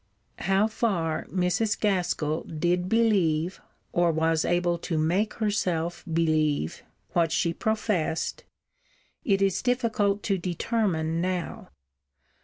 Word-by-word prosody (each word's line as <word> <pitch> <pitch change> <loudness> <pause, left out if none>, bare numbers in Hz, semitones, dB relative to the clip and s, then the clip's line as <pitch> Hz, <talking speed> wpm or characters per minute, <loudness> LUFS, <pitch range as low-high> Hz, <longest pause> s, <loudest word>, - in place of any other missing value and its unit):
How 195 +2 +2
far 180 -8 -1
Mrs. 185 +4 0
Gaskell 175 -6 0
did 175 +3 0
believe, 190 -7 +2 0.3
or 175 -1 +3
was 160 0 +1
able 175 -1 +1
to 165 -1 -2
make 175 +8 +1
herself 180 -6 -1
believe, 155 - +1 0.3
what 165 -2 +2
she 170 0 +1
professed, 200 -6 -1 0.8
it 195 -2 +2
is 195 -2 +1
difficult 225 -5 +1
to 195 -3 0
determine 170 -3 -1
now. 180 -1 -3
175 Hz, 105 wpm, -27 LUFS, 165-205 Hz, 0.8 s, or